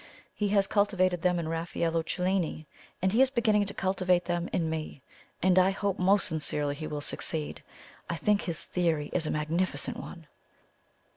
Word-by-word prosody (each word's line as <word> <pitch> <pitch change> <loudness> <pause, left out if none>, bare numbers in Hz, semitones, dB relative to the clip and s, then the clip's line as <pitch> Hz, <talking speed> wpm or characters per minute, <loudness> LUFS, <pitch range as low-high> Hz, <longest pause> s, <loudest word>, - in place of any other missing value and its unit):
He 210 - -1
has 200 -1 +3
cultivated 185 -4 +1
them 180 0 +2
in 170 -2 -2
Raffaello 165 0 -1
Cellini, 180 -1 -1 0.4
and 190 +1 +2
he 235 - +4
is 265 - +5
beginning 215 -5 +2
to 200 - -4
cultivate 185 -2 +1
them 175 0 -2
in 165 - 0
me, 155 -3 -5 0.4
and 185 0 +5
I 185 +1 +5
hope 195 0 -2
most 195 +2 +4
sincerely 150 -2 -1
he 155 +2 -6
will 150 -1 -4
succeed. 155 +1 0 0.5
I 170 - -1
think 205 +5 +2
his 170 -3 -3
theory 165 -5 -1
is 165 -3 0
a - - -1
magnificent 165 +4 -1
one!" 170 -3 -9
180 Hz, 170 wpm, -29 LUFS, 160-195 Hz, 0.5 s, is